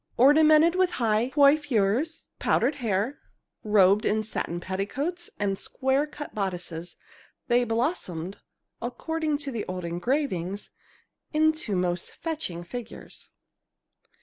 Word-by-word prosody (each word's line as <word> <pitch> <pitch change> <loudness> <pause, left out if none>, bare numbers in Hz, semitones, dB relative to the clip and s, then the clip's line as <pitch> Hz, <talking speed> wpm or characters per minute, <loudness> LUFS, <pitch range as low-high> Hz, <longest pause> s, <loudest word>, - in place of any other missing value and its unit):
Ornamented 310 +5 +6
with 370 0 +2
high 230 0 +2
coiffures, 280 -1 +2
powdered - - +2
hair, 225 +2 -1 0.4
robed 205 -1 +5
in 215 +1 +1
satin 175 -5 -3
petticoats 270 - -3
and 195 -2 -1
square 265 +3 0
cut 295 0 -8
bodices, 180 -4 -4 0.5
they 245 +1 +4
blossomed, 225 - -2 0.4
according 305 +5 -2
to 285 -1 -5
the 230 -4 -3
old 180 -1 -4
engravings, 190 - -2 0.6
into 310 -8 +2
most 180 -1 -1
fetching 300 - -4
figures. 235 +5 -9
235 Hz, 105 wpm, -27 LUFS, 190-295 Hz, 0.6 s, Ornamented